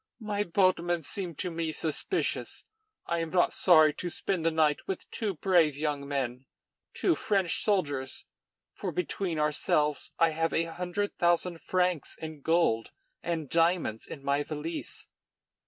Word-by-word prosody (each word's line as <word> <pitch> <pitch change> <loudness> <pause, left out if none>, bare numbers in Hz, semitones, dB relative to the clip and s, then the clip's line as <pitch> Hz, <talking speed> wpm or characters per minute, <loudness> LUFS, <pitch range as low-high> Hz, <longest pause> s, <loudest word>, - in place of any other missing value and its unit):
My 210 -2 -2
boatmen 175 -2 +2
seem 175 +1 -4
to 180 - -3
me 165 -1 -2
suspicious. 160 - -2 0.4
I 170 0 -1
am 165 -1 -2
not 175 +1 +3
sorry 155 -4 +6
to 175 +4 -4
spend 180 0 -2
the 165 - +4
night 155 -2 +1
with 190 - -4
two 210 -5 -2
brave 165 -4 +3
young 145 -2 -2
men, 130 -2 -3 0.5
two 360 - +2
French 195 - 0
soldiers, 145 -11 0 0.5
for, - - -4
between 195 - -2
ourselves, 150 0 +1
I 165 - +5
have 165 +1 0
a 165 - +3
hundred 180 +4 -3
thousand 175 0 +2
francs 180 -4 0
in 155 -2 -7
gold 160 -9 +2 0.3
and 165 -3 -2
diamonds 165 -8 +1
in 140 - -8
my 140 +1 +1
valise." 155 +2 -5
165 Hz, 145 wpm, -29 LUFS, 150-180 Hz, 0.5 s, sorry